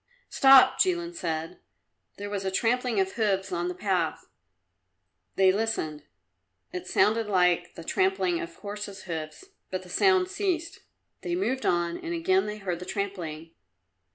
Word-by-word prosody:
"Stop!" 265 -1 +7
Jilin 345 -2 +1
said. 165 - -4 0.6
There 205 0 -6
was 200 -1 -3
a 190 - 0
trampling 235 +3 +1
of 190 0 +1
hoofs 195 -4 0
on 175 0 -1
the 180 - -4
path. 180 -4 -1 1.1
They 190 -1 +5
listened. 190 -8 -2 0.7
It 180 0 -5
sounded 220 +3 +2
like 180 -3 +2
the 165 - -8
trampling 185 0 +1
of 165 0 -7
horses' 205 -1 -7
hoofs, 160 - -6 0.2
but 185 0 -4
the 180 - -14
sound 375 - +3
ceased. 370 -4 -2 0.4
They 350 - -2
moved 265 -8 -1
on 170 -1 0
and 340 0 -4
again 375 +3 +2
they 210 0 -4
heard 185 -4 -3
the 180 - -7
trampling. 175 -5 -5
195 Hz, 150 wpm, -27 LUFS, 175-255 Hz, 1.1 s, Stop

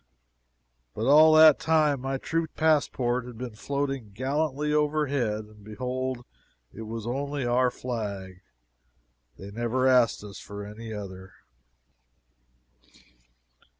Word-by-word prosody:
But - - -2
all 155 +3 +7
that 155 -2 +8
time 155 -4 +2
my 135 +1 -2
true 165 +4 -2
passport 130 -6 +1
had 120 -2 -10
been 125 -1 -6
floating 135 0 -3
gallantly 145 +4 -1
overhead 145 -8 0
and 105 -1 -18
behold 125 +3 -4 0.5
it 110 0 -8
was 115 -1 -6
only 140 +2 -3
our 125 +1 +3
flag. 100 -7 -6 1.0
They 100 +1 -9
never 120 +4 -1
asked 125 -5 +3
us 100 -2 -9
for 100 0 -8
any 110 +2 -9
other. 95 -3 -8
125 Hz, 115 wpm, -27 LUFS, 110-145 Hz, 1.0 s, that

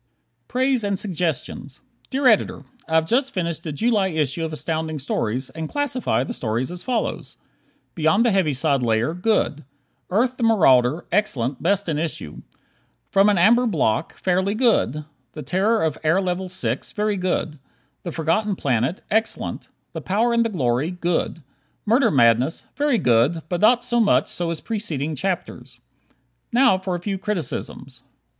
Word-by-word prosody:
Praise 255 -1 +1
and 200 -1 0
Suggestions 165 -7 -3 0.3
Dear 275 +1 -2
Editor: 215 - +2 0.2
I 160 - -1
have 160 0 +4
just 260 - +1
finished 170 -3 -3
the 155 - -4
July 210 +4 +1
issue 155 -2 -1
of 160 - -3
Astounding 160 0 -3
Stories 130 -2 -2
and 160 -1 -6
classify 285 -4 0
the 240 - -5
stories 120 - -2
as 180 0 -7
follows: 245 0 -3 0.6
"Beyond 165 +8 +2
the 235 - +3
Heaviside 150 -7 +1
Layer," 115 +4 +1
good; 180 -5 0 0.5
"Earth, 245 +6 +1
the 240 - -3
Marauder," 155 - +4
excellent, 140 - 0
best 200 +2 +1
in 155 -3 -1
issue; 155 - -4 0.7
"From 195 +1 +5
an 205 - +2
Amber 235 +8 +4
Block," 155 - 0
fairly 190 +2 0
good; 215 - +1 0.3
"The 150 - -7
Terror 200 - +1
of 155 -2 -1
Air 160 +4 +3
Level 185 0 -2
Six," 130 -9 -3
very 210 0 0
good; 180 -5 -2 0.4
"The 175 - -5
Forgotten 170 +7 0
Planet," 130 - -1
excellent; 220 +2 -1 0.3
"The - - -5
Power 225 +5 +1
and 235 0 +3
the 230 - -1
Glory," 135 - 0
good; 175 -2 -2 0.4
"Murder 235 +6 +3
Madness," 125 +2 +2
very 285 -3 +2
good, 125 - +2
but 175 -1 -2
not 240 +3 +5
so 240 -1 +1
much 220 -3 +3
so 175 -1 -2
as 165 -2 -4
preceding 160 - -3
chapters. 180 +2 -4 0.7
Now 245 -5 +4
for 185 -1 -3
a - - -3
few 195 +2 -3
criticisms: 150 - -4
1. 130 - -37
175 Hz, 160 wpm, -22 LUFS, 150-215 Hz, 0.7 s, From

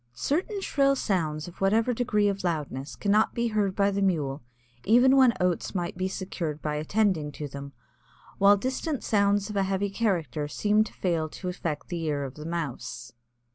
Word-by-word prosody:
Certain 365 - -1
shrill 275 -6 +2
sounds 160 - -1
of 175 - -13
whatever 220 +5 +3
degree 215 -4 +1
of 200 -1 -2
loudness, 150 -5 -3
cannot 210 +1 +2
be 235 0 0
heard 205 -3 0
by 200 0 +3
the 200 0 -1
Mule 150 -7 0 0.4
even 245 +5 +5
when 260 -3 +6
oats 180 +2 0
might 175 -2 -2
be 185 - -1
secured 180 -5 -4
by 150 -1 -3
attending 155 0 0
to 150 - -5
them, 140 0 -8 0.7
while 200 +1 +6
distant 260 +5 -2
sounds 200 0 +2
of - - -7
a 200 - +2
heavy 195 +1 -1
character 170 - -1
seem 210 +7 +2
to - - -10
fail 165 -4 -1
to 180 +3 -6
affect 170 -4 -4
the 175 -2 -3
ear 150 -3 -1
of 135 -2 -6
the 150 +2 -8
Mouse. 150 -9 -5
190 Hz, 180 wpm, -27 LUFS, 155-210 Hz, 0.7 s, when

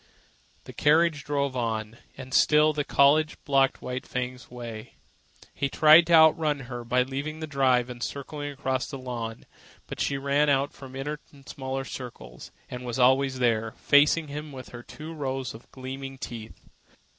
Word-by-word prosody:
The - - -11
carriage 155 0 +3
drove 140 -2 -1
on, 115 -2 -3 0.2
and 130 -1 -9
still 155 0 +5
Collie 145 +1 +4 0.2
blocked 135 -1 +2
White 125 0 -5
Fang's 125 0 -5
way. 115 -3 -8 0.6
He 140 - -2
tried 155 +4 +7
to 170 - +2
outrun 160 -2 +5
her 120 -1 -7
by 125 +2 +2
leaving 140 +4 -5
the 160 - -4
drive 130 -4 +2
and 120 -1 -9
circling 145 +2 -5
across 130 -2 -2
the 140 - -6
lawn 120 -3 -6 0.4
but - - -8
she 140 - 0
ran 140 +2 +2
on 140 0 +2
the 135 -1 -9
inner 150 +2 -4
and 140 -2 -18
smaller 135 0 -4
circle, 120 - -9 0.3
and 125 0 -7
was 120 -1 -4
always 130 +1 +3
there, 115 -3 +1
facing 150 +2 +4
him 150 +1 -6
with 130 -2 -9
her 120 - -9
two 155 +6 -9
rows 135 -4 -3
of 110 +2 -14
gleaming 135 +1 -7
teeth. 115 -3 -8
135 Hz, 165 wpm, -27 LUFS, 125-145 Hz, 0.6 s, tried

